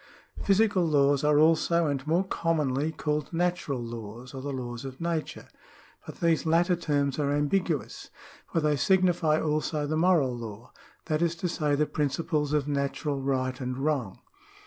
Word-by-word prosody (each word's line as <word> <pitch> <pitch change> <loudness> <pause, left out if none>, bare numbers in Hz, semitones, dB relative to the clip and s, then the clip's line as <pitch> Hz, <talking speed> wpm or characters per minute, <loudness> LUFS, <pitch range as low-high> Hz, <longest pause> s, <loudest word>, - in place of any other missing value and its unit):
Physical 200 -2 +3
laws 145 -3 +3
are 150 0 +4
also, 165 +2 +3
and 140 -1 -2
more 170 +4 +2
commonly, 155 -5 0
called 150 -1 -2
natural 175 -5 -1
laws, 115 +1 -8
or 135 - -6
the 140 +1 -4
laws 120 -2 -5
of 135 -1 -8
nature; 165 -2 -3 0.6
but - - -10
these 165 -2 +2
latter 170 +2 +3
terms 145 -4 -1
are 140 -1 +1
ambiguous, 145 +2 -1 0.4
for - - +1
they 150 -1 +2
signify 175 -1 +2
also 155 0 -1
the 155 +2 -1
moral 160 -7 +3
law; 115 0 -8 0.3
that 155 -1 -1
is 170 -1 +1
to 175 +2 -2
say 150 -4 0
the 150 +1 +2
principles 150 0 -1
of 150 -2 +1
natural 140 0 -2
right 130 -1 -1
and 125 0 -3
wrong. 135 -8 -1
150 Hz, 160 wpm, -27 LUFS, 135-165 Hz, 0.6 s, are